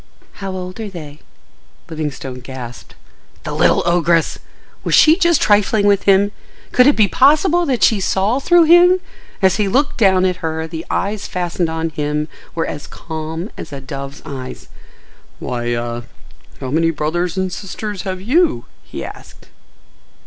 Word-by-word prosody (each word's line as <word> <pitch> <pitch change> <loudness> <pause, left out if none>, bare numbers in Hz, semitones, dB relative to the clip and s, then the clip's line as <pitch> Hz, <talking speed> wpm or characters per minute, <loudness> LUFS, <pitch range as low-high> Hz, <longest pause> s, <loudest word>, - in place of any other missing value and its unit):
"How 195 -1 -3
old 185 +2 -6
are 220 -2 -4
they?" 155 -5 -9 0.7
Livingstone 145 -5 -5
gasped. 125 -1 -9 0.5
The - - -5
little - - +3
ogress! 170 -1 +2 0.4
Was - - +2
she 315 +1 +7
just 340 -3 +3
trifling 205 0 +3
with 200 -1 +3
him? 200 +1 +4 0.4
Could 250 +1 +5
it 290 - +5
be 215 -2 +4
possible 305 - +3
that 255 -4 0
she 220 - +4
saw 195 +6 +1
through 345 +4 +5
him? 350 +3 +6 0.4
As 190 -1 +4
he 210 -2 +1
looked 280 +8 +1
down 190 -4 +4
at 180 -1 0
her 160 -1 -3
the 160 0 -7
eyes 205 +1 -2
fastened 175 -1 -2
on 160 0 -2
him 150 0 -2 0.3
were 165 - 0
as 145 - -6
calm 160 +3 -6
as - - -8
a 140 - -6
dove's 140 +1 -8
eyes. 130 -2 -8 0.7
"Why—ah—. 120 -1 -3 0.6
How 130 - -5
many 165 +2 +2
brothers 165 +4 -2
and 185 -1 -1
sisters 200 +1 -5
have 185 -1 -4
you?" 305 - +1 0.2
he - - -7
asked. - - -12
180 Hz, 155 wpm, -18 LUFS, 155-210 Hz, 0.7 s, she